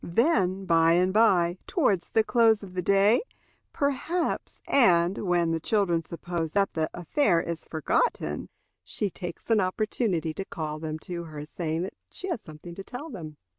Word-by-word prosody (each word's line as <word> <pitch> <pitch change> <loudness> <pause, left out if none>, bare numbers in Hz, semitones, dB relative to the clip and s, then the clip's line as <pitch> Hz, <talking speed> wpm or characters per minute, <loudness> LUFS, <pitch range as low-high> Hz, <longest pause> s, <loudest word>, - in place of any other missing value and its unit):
Then, 190 - +1
by 165 -1 +4
and 180 +2 +2
by, 185 -5 +3
towards 205 - +1
the 220 - +3
close 225 -2 +3
of 185 -2 -10
the 185 - -1
day, 200 - +4 0.5
perhaps, 285 +5 -1
and 180 -7 +4
when 175 -3 +1
the 165 - 0
children 175 -2 +1
suppose 170 -1 -4
that 200 -1 +2
the 160 -1 -1
affair 175 - +1
is 170 -1 -4
forgotten, 110 - -1 0.3
she 190 - -3
takes 175 +5 -7
an 220 - +5
opportunity 185 -4 0
to 195 +5 -5
call 155 -3 -5
them 155 0 -4
to 170 -1 -5
her, 150 -2 -7
saying 160 +1 -3
that 190 - -5 0.2
she 380 - -5
has 340 - -2
something 155 +3 -11
to 195 - -8
tell 285 +9 -8
them. 155 - -8
180 Hz, 170 wpm, -27 LUFS, 165-215 Hz, 0.5 s, an